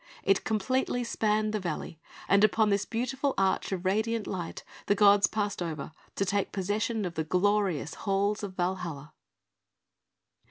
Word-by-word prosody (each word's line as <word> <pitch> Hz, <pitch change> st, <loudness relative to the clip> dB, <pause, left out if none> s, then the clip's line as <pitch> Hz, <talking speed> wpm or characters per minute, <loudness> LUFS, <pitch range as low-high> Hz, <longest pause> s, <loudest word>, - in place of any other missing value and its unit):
It 195 Hz, 0 st, +2 dB
completely 245 Hz, +3 st, 0 dB
spanned 215 Hz, -2 st, 0 dB
the 215 Hz, -, 0 dB
valley; 165 Hz, -3 st, -5 dB, 0.3 s
and 200 Hz, +1 st, +4 dB
upon 215 Hz, 0 st, +4 dB
this 200 Hz, 0 st, +1 dB
beautiful 260 Hz, +4 st, -1 dB
arch 195 Hz, 0 st, +1 dB
of 185 Hz, -1 st, -3 dB
radiant 220 Hz, +3 st, 0 dB
light, 180 Hz, -4 st, -5 dB, 0.2 s
the 205 Hz, -, +3 dB
gods 205 Hz, -1 st, +6 dB
passed 205 Hz, -3 st, -2 dB
over 155 Hz, -4 st, -4 dB, 0.2 s
to 195 Hz, -, 0 dB
take 200 Hz, +1 st, 0 dB
possession 210 Hz, +3 st, -1 dB
of 175 Hz, -, -4 dB
the 160 Hz, -, -1 dB
glorious 185 Hz, -3 st, +1 dB
halls 200 Hz, +2 st, 0 dB
of 195 Hz, -3 st, -6 dB
Valhalla. 175 Hz, -5 st, -3 dB
200 Hz, 150 wpm, -29 LUFS, 185-215 Hz, 0.3 s, gods